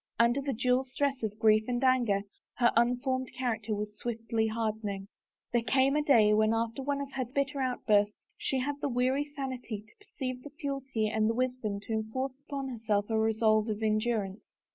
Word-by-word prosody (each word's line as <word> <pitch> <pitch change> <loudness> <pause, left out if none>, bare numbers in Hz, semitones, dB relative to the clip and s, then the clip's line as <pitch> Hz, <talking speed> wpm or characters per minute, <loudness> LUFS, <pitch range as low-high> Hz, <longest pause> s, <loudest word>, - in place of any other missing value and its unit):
Under 235 +4 +3
the 275 0 -2
dual 250 +2 +2
stress 270 +1 -1
of 215 -2 -3
grief 215 0 +4
and 245 +1 -1
anger 245 -6 +3 0.3
her 240 -1 +3
unformed 250 +2 +1
character 225 -4 -1
was 210 0 -4
swiftly 225 -1 -1
hardening. 215 -3 -2 0.5
There 240 - +3
came 270 +3 +3
a 300 - +3
day 230 -8 +5
when 215 +1 +3
after 230 +3 -1
one 280 +1 -1
of 280 0 -6
her 270 -1 -2
bitter 275 +3 -2
out 255 -1 -2
bursts 205 -1 +2
she 270 - -1
had 285 +2 -3
the 290 - 0
weary 255 +3 +1
sanity 260 -7 -5
to 215 - -23
perceive 265 - -5
its 290 -1 -11
futility 270 -6 -2
and 215 0 +1
the 225 - 0
wisdom 250 -5 -1
to 225 - -5
enforce 260 +5 -3
upon 280 -2 -4
herself 220 -3 -1
a 220 - +2
resolve 220 0 +3
of 215 +1 -2
endurance. 215 -2 -1
240 Hz, 185 wpm, -30 LUFS, 220-265 Hz, 0.5 s, day